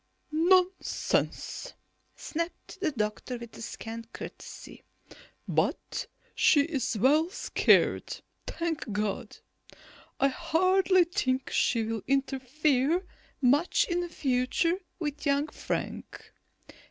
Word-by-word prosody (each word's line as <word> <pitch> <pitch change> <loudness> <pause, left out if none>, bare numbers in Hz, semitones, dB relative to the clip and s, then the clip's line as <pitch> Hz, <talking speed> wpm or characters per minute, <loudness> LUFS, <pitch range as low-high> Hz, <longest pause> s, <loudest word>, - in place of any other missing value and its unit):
"Nonsense," 365 +8 +1 0.4
snapped 335 +3 -5
the 370 -5 +1
doctor 215 +1 -3
with 235 -1 -9
scant 230 0 -7
courtesy. - - -9 0.6
"But - - -1 0.3
she 290 - +5
is 280 -7 -1
well 295 - +4
scared, - - +2 0.3
thank 325 -8 -3
God. 205 -1 -2 0.8
I 275 - +4
hardly 370 +5 +3
think 270 -8 -1
she 230 -2 +2
will 220 -1 -3
interfere 275 +4 +1 0.4
much 285 +7 +4
in 350 0 -1
future 280 +5 +1 0.2
with 295 -3 -4
young 285 +2 +2
Frank. - - -5
290 Hz, 90 wpm, -29 LUFS, 250-340 Hz, 0.8 s, she